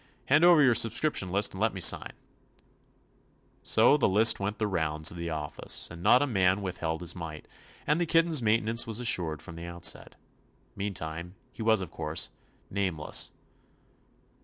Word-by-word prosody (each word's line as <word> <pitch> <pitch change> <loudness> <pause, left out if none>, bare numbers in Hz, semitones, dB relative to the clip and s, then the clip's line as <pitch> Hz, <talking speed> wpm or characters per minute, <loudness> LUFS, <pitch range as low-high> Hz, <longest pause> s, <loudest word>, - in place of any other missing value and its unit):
Hand 150 +4 +4
over 175 -4 +6
your 130 -3 +5
subscription 115 -3 +1
list 100 +3 +1
and 95 - -7
let 110 - +1
mc 95 - -1
sign/' - - -10 1.5
So 120 +6 +4
the 140 - +2
list 110 +4 +5
went 100 +2 -3
the 110 - -1
rounds 80 -5 -1
of 85 - -10
the 85 0 -5
office, 75 -2 -4
and 85 0 -10
not 120 +8 +4
a - - +1
man 95 -5 +1
withheld 85 -3 -4
his 85 - -4
mite, 80 -3 -8 0.4
and 150 +4 +1
the 170 - 0
kitten's 165 -3 +2
maintenance 115 +1 +1
was 110 0 -2
assured 85 -10 -2
from 85 - -10
the 85 - -8
outset. 85 0 -2 0.6
Mean 100 0 -4
time, 85 +3 -6 0.2
he 120 - -11
was, 110 -2 +2
of 90 - -7
course, - - -2 0.4
nameless. 90 -6 -1
100 Hz, 170 wpm, -28 LUFS, 85-115 Hz, 1.5 s, over